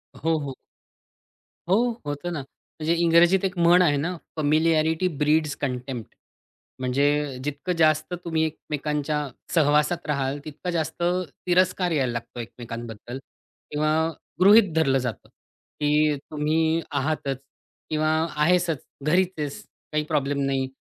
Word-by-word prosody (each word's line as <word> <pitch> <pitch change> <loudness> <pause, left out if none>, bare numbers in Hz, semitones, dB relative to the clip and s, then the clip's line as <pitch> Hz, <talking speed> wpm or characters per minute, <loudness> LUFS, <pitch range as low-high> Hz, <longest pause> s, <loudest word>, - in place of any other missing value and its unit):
हो, 165 0 0
हो. 140 -2 -5 1.1
हो, 190 - +5 0.3
होतं 145 +4 -4
ना. 155 - -3 0.4
म्हणजे 160 +2 +1
इंग्रजीत 170 +3 +5
एक 185 -1 -2
म्हण 175 +2 +6
आहे 150 -5 +4
ना 170 +6 -2 0.2
"फॅमिलिॲरिटी 160 +2 +2
ब्रीड्स 150 0 +2
कंटेम्प्ट." 125 -3 -4 0.6
म्हणजे 140 +2 +1
जितकं 150 +5 -2
जास्त 155 +2 +3
तुम्ही 160 -2 +1
एकमेकांच्या 150 -1 -2 0.4
सहवासात 150 +2 +2
राहाल, 140 -1 -1
तितकं 155 +4 -6
जास्त 160 -1 -2 0.5
तिरस्कार 180 0 +2
यायला 135 -6 +1
लागतो 120 +1 -6
एकमेकांबद्दल 120 0 -7 0.5
किंवा 150 +1 +1 0.5
गृहीत 200 0 +7
धरलं 135 -5 +3
जातं, 125 -3 -5
की 150 0 -1 0.2
तुम्ही 160 +2 +1
आहातच 140 -2 -1 0.5
किंवा 155 0 +1 0.3
आहेसच 165 -1 +2 0.2
घरीच 175 +5 +3
आहेस. 145 -2 -4 0.3
काही 150 0 0
प्रॉब्लेम 145 -2 0
नाही. 135 -1 0
150 Hz, 120 wpm, -25 LUFS, 140-165 Hz, 1.1 s, गृहीत